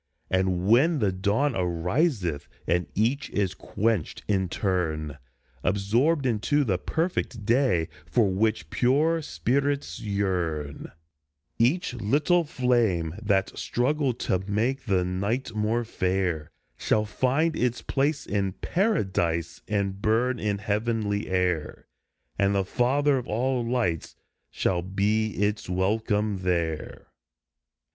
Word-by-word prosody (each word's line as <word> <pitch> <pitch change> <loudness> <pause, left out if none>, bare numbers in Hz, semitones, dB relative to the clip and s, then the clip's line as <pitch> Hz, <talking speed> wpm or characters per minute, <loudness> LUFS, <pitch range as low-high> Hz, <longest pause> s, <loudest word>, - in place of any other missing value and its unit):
And 95 -1 +1
when 140 +9 +5
the 105 -7 +1
dawn 105 +9 +1
ariseth, 90 - 0 0.2
and 90 +1 +1
each 125 +8 +1
is 95 -2 0
quenched 110 -6 -1
in 95 -3 +1
turn, 80 -7 -1 0.4
Absorbed 115 - +2
into 130 +5 +2
the 95 -8 0
perfect 160 - -2
day 115 - +2 0.2
for 115 -4 +3
which 95 -4 0
pure 155 +6 +2
spirits 140 - -1
yearn; 90 -8 -2 0.7
Each 130 +5 +2
little 145 - +2
flame 115 - +1
that 100 -3 +1
struggled 130 0 0
to 95 - +1
make 125 +7 0
the 95 -5 +1
night 100 +7 -2
more 110 +2 0
fair 90 -7 -1 0.3
Shall 105 0 +1
find 135 +9 +1
its 125 -3 -1
place 140 +2 0
in 100 -2 -1
Paradise 95 - 0
and 100 -2 -1
burn 120 +4 +1
in 105 -1 0
heavenly 105 0 -1
air, 90 -4 -1 0.5
And 100 0 +3
the 95 -1 +1
Father 135 +6 +2
of 125 - -8
all 125 +3 0
Lights 115 -9 -1 0.3
shall 90 -2 0
be 105 +4 0
its 105 -1 -1
welcome 105 +2 0
there. 85 -4 -2
105 Hz, 115 wpm, -26 LUFS, 95-125 Hz, 0.7 s, when